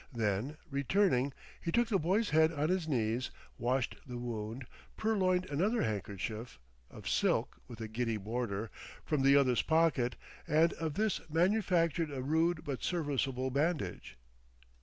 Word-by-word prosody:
Then, 115 +5 -1
returning, 140 -1 +2 0.3
he 170 - -2
took 235 +2 +2
the 200 -4 +2
boy's 195 +7 +1
head 160 +1 +5
on 150 0 0
his 180 -3 0
knees, 120 -3 0 0.3
washed 125 +1 0
the 125 -1 -5
wound, 120 +1 -4 0.3
purloined 185 -4 +2
another 190 +11 +1
handkerchief 110 +2 -4 0.3
(of - - -10
silk, - - +1
with 120 -2 -10
a 110 - -3
giddy 115 0 -1
border) 110 0 -3 0.3
from 150 -3 +1
the 135 +1 +6
other's 130 -4 +4
pocket, 160 -7 +2 0.3
and 160 +3 +4
of 160 -3 -3
this 215 +1 +1
manufactured 170 -2 +2
a 135 -3 -4
rude 160 +3 +1
but 140 -3 -3
serviceable 135 -6 -1
bandage. 140 - -1
140 Hz, 140 wpm, -33 LUFS, 120-170 Hz, 0.3 s, the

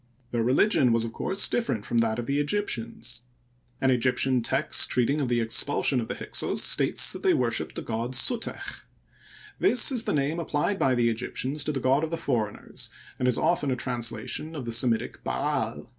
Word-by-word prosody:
Their 120 - 0
religion 130 - +3
was 115 0 +1
of 115 - -6
course 195 - 0
different 120 - -1
from 115 - 0
that 110 -1 +1
of 120 - -3
the 140 +3 0
Egyptians. 125 - -3 0.6
An 130 - +2
Egyptian 130 0 +2
text - - +2
treating 130 +5 +1
of 135 - 0
the 120 -1 +1
expulsion 125 +3 +2
of 110 - -5
the - - -4
Hyksos - - -1
states - - +4
that - - -8
they - - +3
worshiped 120 -2 -1
the - - -4
god 115 +3 -3
Suteck. 230 - -2 0.7
This 275 -7 +5
is 245 -4 +1
the - - 0
name 150 +3 0
applied 165 +4 -1
by 130 -1 +2
the 120 -1 +2
Egyptians 130 +5 -2
to - - 0
the 140 - -2
god 135 +4 +2
of 160 - -1
the 165 - -3
foreigners, 115 -10 -3 0.3
and 125 - +1
is 125 - +3
often 150 -5 +1
a 130 - +1
translation 120 +5 -4
of 135 -5 -5
the 115 - -4
Semitic 115 -1 0
Ba*al. 60 +1 -2
125 Hz, 190 wpm, -26 LUFS, 115-145 Hz, 0.7 s, This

